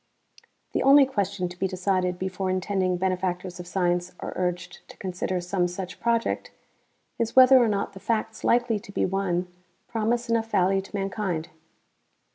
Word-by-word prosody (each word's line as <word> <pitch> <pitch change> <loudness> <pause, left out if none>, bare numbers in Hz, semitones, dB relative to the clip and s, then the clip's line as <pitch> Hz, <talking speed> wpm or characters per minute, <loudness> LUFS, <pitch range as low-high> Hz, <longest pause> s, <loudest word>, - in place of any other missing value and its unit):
The - - 0
only 275 +1 +7
question 200 -7 -2
to 175 0 -11
be 190 - +1
decided 185 -1 0
before 190 +1 -3
intending 185 -1 0
benefactors 180 -1 -2
of 175 - -7
science 180 -1 0
are - - -5
urged 180 0 -3
to - - -13
consider 185 -1 -3
some 180 0 0
such 180 +1 -6
project 235 -1 0 0.7
is 230 -1 -1
whether 260 0 +8
or - - +2
not 200 -2 -1
the 195 - -10
facts 220 +2 -2
likely 240 -2 +2
to 200 - -12
be - - 0
won 185 -2 -1 0.4
promise 230 +1 -1
enough 230 -1 0
value 195 -1 +2
to 195 - -11
mankind. 195 -4 -2
190 Hz, 160 wpm, -26 LUFS, 180-215 Hz, 0.7 s, whether